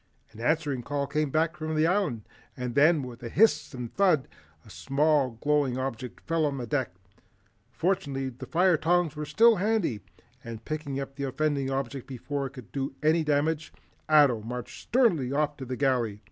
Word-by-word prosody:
An 110 - -14
answering 145 0 0
call 140 +3 -2
came 150 0 -1
from 155 0 -1
the 155 +1 +3
Island, 170 - 0 0.3
and 125 -1 -4
then, 150 +2 +4
with 125 -1 -9
a 120 - -6
hiss 220 - +3
and 125 -2 -6
thud, 180 -9 +3 0.4
a - - -15
small 140 -3 +1
glowing 145 -4 +2
object 130 -2 -5
fell 165 -1 0
on 140 -1 -3
the 125 - -4
deck. 120 -7 -2 0.7
Fortunately 135 -2 -1
the 125 - -10
fire 180 0 +3
tongs 170 -1 +1
were 150 0 -4
still 230 +4 +5
handy 190 - 0 0.4
and 115 -1 -8
picking 150 -3 -4
up 135 0 -7
the 140 - -2
offending 140 0 -1
object 135 -1 -3
before 140 +2 -4
it 130 - -13
could 130 -6 -12
do 135 -1 -3
any 160 +2 +3
damage, 150 +1 0 0.4
Ato 145 -7 +5
marched 120 +2 -7
sternly 205 - +2
off 150 +1 0
to 130 - -7
the 130 0 -4
galley. 125 -7 0
140 Hz, 175 wpm, -27 LUFS, 130-155 Hz, 0.7 s, still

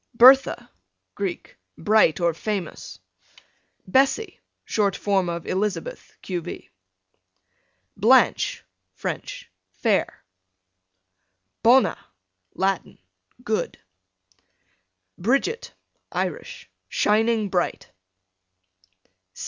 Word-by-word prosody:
Bertha, 260 +3 +6 0.4
Greek, 195 -3 -5 0.2
bright 210 -3 +3
or 170 -1 +2
famous. 195 0 -5 0.9
Bessie, 270 - +1 0.3
short 200 -3 +1
form 195 -4 0
of 170 -1 -4
Elizabeth. 210 - -3
q.v. 175 -2 -6 1.2
Blanche, - - +3 0.3
French, - - -6 0.2
fair. - - -1 1.4
Bona, 250 +3 +4 0.5
Latin, 190 -1 -1 0.5
good. 215 -2 -2 1.4
Bridget, 275 - 0 0.4
Irish, - - -4 0.2
shining 220 0 +2
bright. 180 -2 -2
210 Hz, 65 wpm, -24 LUFS, 185-235 Hz, 1.4 s, Bertha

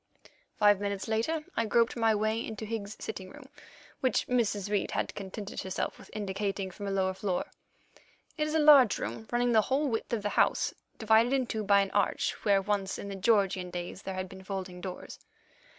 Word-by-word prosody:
Five 205 -2 +5
minutes 200 0 -3
later 270 +9 -1
I 230 - 0
groped 230 +2 +3
my 225 -2 +3
way 215 +2 0
into 220 -1 -6
Higgs's 215 -2 -5
sitting 190 -3 -6
room, 285 -2 -13 0.5
which 260 - +1
Mrs. 215 -5 0
Reid 205 -2 +1
had - - -1
contented 200 +1 -6
herself 190 0 -3
with - - -14
indicating 195 -1 -3
from 200 +3 -7
a - - -1
lower 190 -1 +1
floor. 190 -1 -2 0.9
It 305 -1 0
is 305 - -2
a - - +4
large 285 -7 +7
room, 220 - -5
running 245 0 +2
the 220 -2 +5
whole 270 +6 0
width 225 -4 -2
of 225 -3 -1
the 205 - 0
house, - - +2 0.2
divided 225 +3 +4
into 255 -5 0
two - - -2
by 200 0 +5
an 195 - -2
arch, 205 -1 +1
where 200 -2 +3
once, 195 -1 -1
in 200 - -6
the 195 - -5
Georgian 195 -3 +2
days, 175 +1 -6
there 190 -2 -5
had 185 0 -3
been 190 +1 -12
folding 185 -2 -5
doors. 185 -1 -7
205 Hz, 200 wpm, -30 LUFS, 195-230 Hz, 0.9 s, large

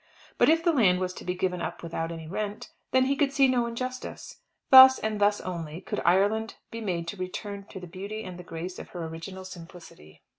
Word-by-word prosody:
But - - +5
if 325 +1 +3
the 340 -1 +3
land 190 -10 +4
was 185 0 -2
to - - -10
be 180 0 -2
given 180 -1 -1
up - - -5
without 165 0 -3
any 165 -1 -7
rent, 205 +4 -4 0.2
then 260 0 +3
he 275 +1 +1
could 280 -1 +1
see 275 -1 +4
no 245 -2 +1
injustice. 255 +2 -6 0.3
Thus, 260 0 +11
and 215 -1 -3
thus 205 0 +3
only, 165 -3 -5
could - - -4
Ireland 205 +5 +2 0.2
be 230 - -6
made 175 -5 -2
to 205 - -6
return 200 +2 -6
to 190 - -8
the 180 - -9
beauty 200 +5 -7
and 180 -2 -8
the - - -8
grace 175 +2 -7
of - - -9
her 175 -2 -6
original 175 +4 -8
simplicity. 170 - -13
190 Hz, 220 wpm, -27 LUFS, 175-225 Hz, 0.3 s, Thus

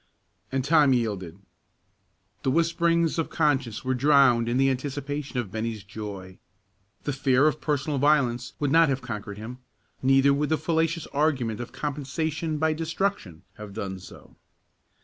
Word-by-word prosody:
And 135 -1 -1
Tom 145 -3 +5
yielded. 100 -8 -2 1.0
The - - 0
whisperings 170 +2 +2
of 165 - -1
conscience 135 -7 0
were 130 - +1
drowned 130 -3 +4
in 120 - 0
the 135 0 +4
anticipation 140 +1 -4
of 115 -6 -2
Bennie's 110 -1 -4
joy. 100 -2 -8 0.6
The 145 - -2
fear 135 0 +3
of 155 0 +1
personal 145 -1 -1
violence 130 -4 +2
would 145 -2 0
not 165 0 +5
have 135 0 -1
conquered 105 -3 -6
him; 120 +4 -8 0.4
neither 135 +1 +4
would 145 +1 0
the 160 - +2
fallacious 165 0 0
argument 135 -7 0
of 120 - -6
compensation 155 +2 -3
by 160 +1 +1
destruction 165 - -3
have 105 -2 -9
done 95 -3 -4
so. 90 - -14
135 Hz, 150 wpm, -26 LUFS, 115-150 Hz, 1.0 s, Tom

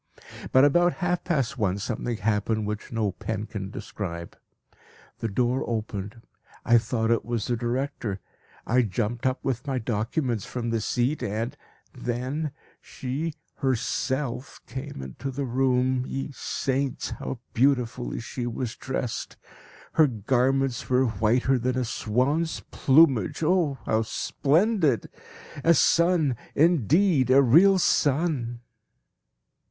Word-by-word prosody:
But 130 +2 +6
about 175 +4 +4
half 180 -1 -1
past 140 -6 -1
one 100 -3 +1
something 115 +2 -3
happened 105 +1 0
which 105 0 -5
no 110 -4 0
pen 110 +2 -4
can 100 -3 -6
describe. 85 -4 -6 0.8
The 115 - -2
door 120 +5 0
opened. 110 -1 -4 0.4
I 120 0 +6
thought 115 -1 -1
it 115 - +2
was 115 -2 -2
the 120 - 0
director; 120 -3 -2 0.5
I 125 +2 +3
jumped 115 +3 -1
up 130 +1 -2
with 130 0 -2
my 135 -2 0
documents 115 - -1
from 120 -2 -4
the 115 -1 0
seat, 125 +7 0
and 110 +4 -2 0.4
then 130 +6 -3 0.3
she 145 +5 -4 0.2
herself 130 0 -2
came 130 - -7
into 65 - -6
the 135 +1 -3
room. 130 0 +1
Ye 135 +1 -4
saints! 135 0 -2
how 130 - -5 0.2
beautifully 125 -1 +1
she 120 +1 -5
was 120 0 -3
dressed. 130 -3 -4 0.6
Her 155 -2 +5
garments 130 +3 0
were 130 +1 +4
whiter 120 +4 +2
than 125 +2 -1
a 130 - 0
swan's 130 +9 0
plumage 135 - +4
oh 160 -4 +2
how 110 0 +2
splendid! 155 - +1 0.5
A 170 0 +5
sun, 170 -8 +3 0.2
indeed, 160 - +3
a 135 +2 +6
real 175 +10 +6
sun! 140 -8 +1
125 Hz, 125 wpm, -26 LUFS, 115-140 Hz, 0.8 s, But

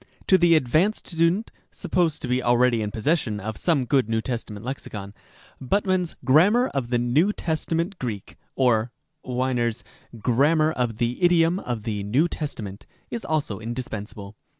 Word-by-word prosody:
To 190 - +5
the 170 -1 +5
advanced 155 - +1
student 170 +5 +1 0.2
(supposed 175 -3 -1
to - - -2
be 125 +1 +1
already 120 -1 +3
in 105 - -2
possession 110 -1 0
of 110 +2 -5
some 150 - +1
good 130 -3 +2
New 110 0 +1
Testa 120 -1 -4
ment 105 +2 -9
Lexicon), 105 -6 -6 0.5
Buttmann's 185 +4 0
"Grammar 200 - +5
of 135 -4 -3
the 120 - +2
New 130 +11 +2
Testament 165 +1 -2
Greek 110 -6 -5
" - - -47
(or 115 -1 +2 0.3
Winer's 125 -2 -1 0.2
" 115 - -14
Grammar 155 +6 +3
of 120 -6 -2
the 120 +6 -1
Idiom 175 0 +4
of 120 - -4
the 105 -3 -3
New 125 +12 +2
Tes 150 -3 -4
tament 100 -2 -8
") - - -39
is 235 - -4
almost 155 -6 -1
indispensable. 110 -4 -6
130 Hz, 170 wpm, -24 LUFS, 115-165 Hz, 0.5 s, To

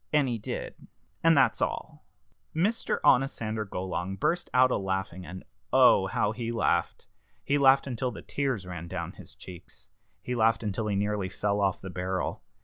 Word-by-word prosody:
And 150 -3 +3
he 120 -2 -2
did. - - -6 0.4
And 165 -1 +5
that's 135 - +3
all." - - -3 0.5
Mr. 200 +8 0
Onosander 110 -5 +2
Golong 95 0 -4
burst 175 - 0
out 130 0 +5
a - - +2
laughing, 95 -2 -3
and 95 0 -8 0.3
oh! - - +6
how 105 - 0
he 115 +1 -4
laughed! 115 - 0 0.4
He 145 +1 +1
laughed 135 0 +5
until 130 -1 -2
the - - -9
tears 135 -9 -2
ran 90 -2 -7
down - - -4
his - - -14
cheeks. 90 -2 -13 0.3
He 125 - -3
laughed 115 -1 +2
until 105 +1 -2
he 105 - 0
nearly 100 -1 -1
fell 100 +2 -1
off 95 -2 0
the 95 - -7
barrel. 90 +1 -3
110 Hz, 170 wpm, -28 LUFS, 95-130 Hz, 0.5 s, oh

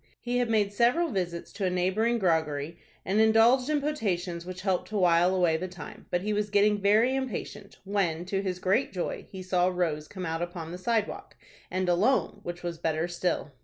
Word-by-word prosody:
He 245 0 -1
had 245 -2 0
made 210 -3 +1
several 250 +10 +2
visits 175 -4 -3
to 200 - -2
a - - +2
neighboring 190 +6 +1
groggery 160 -4 0 0.3
and 200 +3 +2
indulged 230 +4 +5
in 300 -1 +2
potations 180 - -2
which 185 0 -6
helped 190 -2 0
to 215 - -3
while 175 0 +4
away 175 -3 +3
the 185 +3 -4
time, 175 -2 -11
but 175 - 0
he 210 +2 -1
was 210 0 -1
getting 205 0 +3
very 215 +6 +4
impatient, 255 -6 -5
when, 185 -4 -1
to 195 +1 -1
his 185 -2 -3
great 190 +8 +1
joy, 180 -3 -4
he 190 -1 -8
saw 180 -1 +2
Rose 165 -5 -1
come 185 -2 -6
out 165 0 -2
upon 175 -2 -5
the 180 - -7
sidewalk, 220 +1 -2 0.3
and 185 0 -1
alone, 200 +10 +2
which 175 0 -7
was 170 -2 -4
better 160 +1 0
still. 175 -3 -2
185 Hz, 200 wpm, -28 LUFS, 175-215 Hz, 0.3 s, indulged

